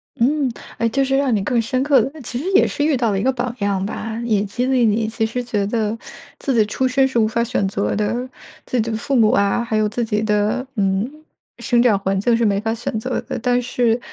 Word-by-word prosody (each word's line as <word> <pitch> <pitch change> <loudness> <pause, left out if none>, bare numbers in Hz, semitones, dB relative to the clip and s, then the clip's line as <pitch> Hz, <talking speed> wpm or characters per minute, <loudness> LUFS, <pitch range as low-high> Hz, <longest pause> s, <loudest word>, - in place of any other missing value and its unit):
嗯， 270 +2 +1 0.3
呃， 230 - +2
就 270 +4 +1
是 270 0 +1
让 270 -4 +2
你 200 - 0
更 235 +3 +1
深 255 +3 -1
刻 275 -3 +4
地 275 +7 -5
其 240 +1 -4
实 295 - -5
也 390 - +6
是 290 - -2
遇 300 -2 +2
到 235 -3 +1
了 195 - 0
一 - - -2
个 265 - +3
榜 250 -1 -3
样 200 -2 0
吧。 220 +2 -4
也 215 -4 +1
激 225 +5 -2
励 260 -2 +2
你 220 +1 +1
其 220 0 -1
实 245 +3 -3
觉 210 -4 -1
得 215 0 -1 0.4
自 270 - -1
己 220 -2 +4
出 260 +5 0
身 265 +1 +3
是 260 -3 0
无 220 - +3
法 235 +2 0
选 235 -4 0
择 200 +1 -1
的， 235 +5 -1 0.4
自 250 - 0
己 225 - -3
的 220 - -1
父 275 +5 -2
母 225 -4 +5
啊， 200 +4 +2
还 225 -2 -1
有 215 0 +2
自 230 +3 -2
己 210 -1 -1
的， 215 +4 0
嗯， 195 +2 0 0.5
生 240 -1 +2
长 225 -5 +4
环 195 0 -1
境 230 +4 +2
是 235 - +1
没 200 -2 +2
法 225 +1 -1
选 225 -1 -4
择 255 +3 -2
的， - - -5
但 245 +1 +1
是 240 -1 +1
230 Hz, 270 characters per minute, -20 LUFS, 210-255 Hz, 0.5 s, 也